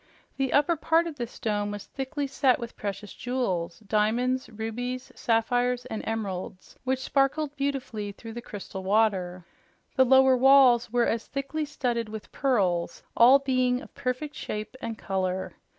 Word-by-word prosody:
The 270 -1 0
upper 295 +4 +3
part 325 +2 +2
of 325 -3 -6
this 240 -2 -6
dome 205 -2 -1
was 205 -1 -6
thickly 280 +2 -4
set 270 -2 +2
with 235 -1 -7
precious 205 0 -5
jewels 195 -10 -2
diamonds, 225 +5 0
rubies, 240 +3 -5
sapphires 245 +2 +1
and 220 -4 -4
emeralds, 190 -4 -4
which 260 0 +1
sparkled 275 +3 0
beautifully 270 -7 -3
through 225 +3 -10
the 240 - -6
crystal 195 -3 -7
water. 190 -4 +1 0.5
The 260 - +7
lower 265 0 +6
walls 255 -3 +6
were 240 0 +3
as 230 0 -1
thickly 280 +3 -3
studded 240 -6 -2
with 215 -1 -8
pearls, 190 -11 0
all 250 +4 +8
being 255 -2 +1
of - - -13
perfect 280 +2 -3
shape 215 -3 -5
and 225 -1 -4
color. 190 -2 -2
245 Hz, 150 wpm, -27 LUFS, 210-265 Hz, 0.5 s, all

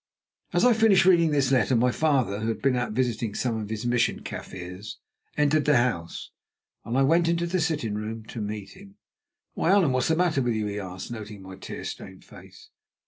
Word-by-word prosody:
As - - +2
I 250 - +6
finished 220 -5 +4
reading 170 -3 +5
this 140 -3 +1
letter 130 0 +3
my 125 +2 +3
father, 130 -9 +1
who 110 - -3
had 115 - -2
been 135 -2 +3
out 120 -3 -2
visiting 115 -3 -1
some 120 -3 -1
of 105 - -6
his 110 +1 -4
Mission 120 -1 +1
Kaffirs, 90 +4 -8 0.4
entered 150 0 +2
the 150 -3 +4
house, 115 -9 -2 0.5
and 120 +3 -2
I 135 - +4
went 165 +5 +3
into 170 0 +1
the 175 +1 -1
sitting 150 -10 -1
room 110 +1 -5
to 115 - -6
meet 105 -1 -5
him. 195 0 -15 0.6
"Why, - - 0
Allan, 190 -8 +4
what 130 -1 +1
is - - 0
the 160 - +3
matter 170 -5 +1
with 120 -2 0
you?" 110 -1 -1
he 105 0 -3
asked, 95 +2 -7
noting 105 -3 -8
my 95 0 -9
tear 95 - -8
stained - - -8
face. - - -15
125 Hz, 210 wpm, -26 LUFS, 110-155 Hz, 0.6 s, I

